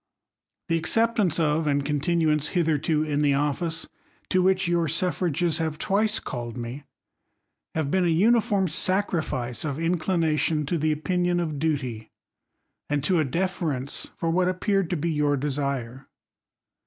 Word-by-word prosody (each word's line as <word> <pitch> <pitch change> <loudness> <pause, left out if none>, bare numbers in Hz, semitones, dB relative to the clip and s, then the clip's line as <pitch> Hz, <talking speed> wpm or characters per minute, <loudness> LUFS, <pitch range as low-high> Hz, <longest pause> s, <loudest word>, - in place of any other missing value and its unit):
The 165 -2 +1
acceptance 215 -2 +2
of, 155 0 +1
and 140 -1 +1
continuance 150 0 +1
hidierto 155 -3 +1
in 145 -1 0
the 145 -2 +3
office 150 +4 -1 0.4
to 185 - +4
which 190 0 +2
your 170 -1 +1
suffrages 170 0 0
have 160 -2 -2
twice 210 +5 +1
called 120 -1 -6
me, 120 +4 -6 0.9
have 155 -3 -1
been 190 -1 +2
a - - +3
uniform 200 +2 +3
sacrifice 160 - -1
of 145 -3 -3
inclination 165 -2 +1
to 165 +4 -1
the 155 +1 +1
opin 175 +4 0
ion 175 0 +1
of 155 -4 -2
duty, 130 -8 -2 0.8
and 145 -1 0
to 175 +2 +2
a - - +3
deference 150 -3 -2
for 165 - -1
what 180 +2 +2
appeared 195 0 0
to 180 - -1
be 165 +3 -1
your 145 -2 +1
desire. 135 -2 -3
160 Hz, 145 wpm, -25 LUFS, 145-180 Hz, 0.9 s, to